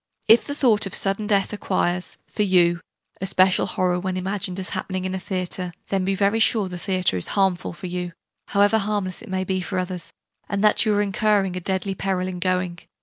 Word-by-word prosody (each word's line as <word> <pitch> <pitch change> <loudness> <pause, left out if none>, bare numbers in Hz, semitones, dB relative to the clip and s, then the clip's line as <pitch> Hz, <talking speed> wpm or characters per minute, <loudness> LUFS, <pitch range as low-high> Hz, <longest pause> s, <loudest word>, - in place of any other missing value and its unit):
If 225 +2 +6
the 285 - -3
thought 220 -7 +3
of 195 - -1
sudden 200 +2 +1
death 200 -1 +1
acquires, 185 -3 -1
for - - -4
you, 175 -3 +3 0.4
a 190 - -1
special 185 0 +3
horror 180 -1 0
when 185 0 -3
imagined 185 0 -3
as 185 - -4
happening 185 -1 -3
in 185 - -2
a 190 - -2
theatre, 185 -1 -2 0.2
then 195 -1 0
be 195 +1 0
very 200 +3 +2
sure 220 -3 +3
the 180 -1 -7
theatre 185 - 0
is 90 - 0
harmful 190 -3 +1
for 175 +2 -9
you, 180 -1 -4 0.3
however 205 +2 +3
harmless 200 -3 -2
it - - -11
may 185 0 -1
be 185 0 -1
for 185 +1 -4
others; 180 -2 -4 0.4
and 200 0 -1
that 215 +2 +4
you 210 - +3
are 205 - +3
incurring 200 -2 +1
a - - -2
deadly 190 +1 -2
peril 190 -1 -1
in 180 -1 -5
going. 180 -1 -1
190 Hz, 210 wpm, -23 LUFS, 180-200 Hz, 0.4 s, If